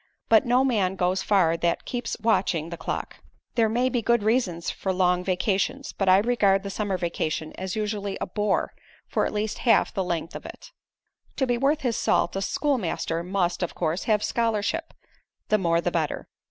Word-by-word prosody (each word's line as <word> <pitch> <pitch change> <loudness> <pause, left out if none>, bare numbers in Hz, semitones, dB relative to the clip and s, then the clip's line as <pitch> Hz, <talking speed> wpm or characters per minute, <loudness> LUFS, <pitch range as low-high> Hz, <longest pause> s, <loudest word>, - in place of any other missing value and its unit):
But 225 +1 +5
no 250 +2 +4
man 200 -7 +1
goes 185 +1 +1
far 185 -5 +3
that 170 0 -1
keeps 240 -2 -3
watching 180 -7 +1
the - - -3
clock. - - -4 0.4
There 230 -3 +3
may 245 +3 +1
be 250 -2 0
good 235 -1 +2
reasons 210 -7 0
for 190 - -3
long 180 -1 +2
vacations, 195 +8 -1
but 195 -2 +1
I 185 - +7
regard 200 -3 +2
the 200 - -5
summer 200 -1 -1
vacation 160 -3 -2
as 190 +1 -5
usually 210 -2 -2
a - - -2
bore 205 +2 -1 0.3
for - - 0
at - - -5
least 210 0 -2
half 230 -4 +3
the 190 - -1
length 170 -2 -3
of - - -6
it. - - -11 0.6
"To 265 - +1
be 245 -1 +1
worth 280 +5 +1
his 240 -4 0
salt, - - +1
a 195 - -1
schoolmaster 195 - -1
must, 180 0 -1
of 175 - -2
course, 165 +1 -1
have 210 -2 +2
scholarship 230 +8 -1 0.5
the 215 - +3
more 170 -2 +2
the 175 - -1
better. 160 -4 -2
200 Hz, 190 wpm, -25 LUFS, 180-230 Hz, 0.6 s, I